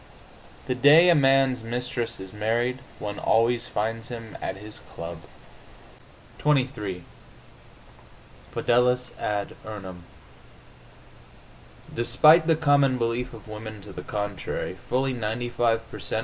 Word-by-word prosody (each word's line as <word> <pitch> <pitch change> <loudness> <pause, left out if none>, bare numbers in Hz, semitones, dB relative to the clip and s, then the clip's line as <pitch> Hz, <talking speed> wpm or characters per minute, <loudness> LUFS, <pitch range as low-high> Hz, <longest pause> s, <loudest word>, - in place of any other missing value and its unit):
The 125 - 0
day 145 +7 +7
a - - +8
man's 135 -4 +3
mistress 120 0 -3
is 95 0 -9
married 120 +4 0 0.2
one 105 -1 -5
always 115 +2 +2
finds 115 0 -2
him 115 -2 -8
at 95 - -3
his 105 +2 -11
club. 85 0 -7 1.2
XXIII 125 -11 0 1.5
FIDELIS 125 +1 +2
AD 105 -1 -2
URNUM 95 -5 -8 1.9
Despite 150 +8 +5
the 165 - +5
common 145 -4 +3
belief 120 +1 -1
of 110 - -13
women 110 0 -8
to 100 - -11
the - - -6
contrary, 105 -2 -4
fully 130 +1 -1
95 115 0 -1
per - - -8
cent. - - -2
120 Hz, 115 wpm, -25 LUFS, 105-130 Hz, 1.9 s, a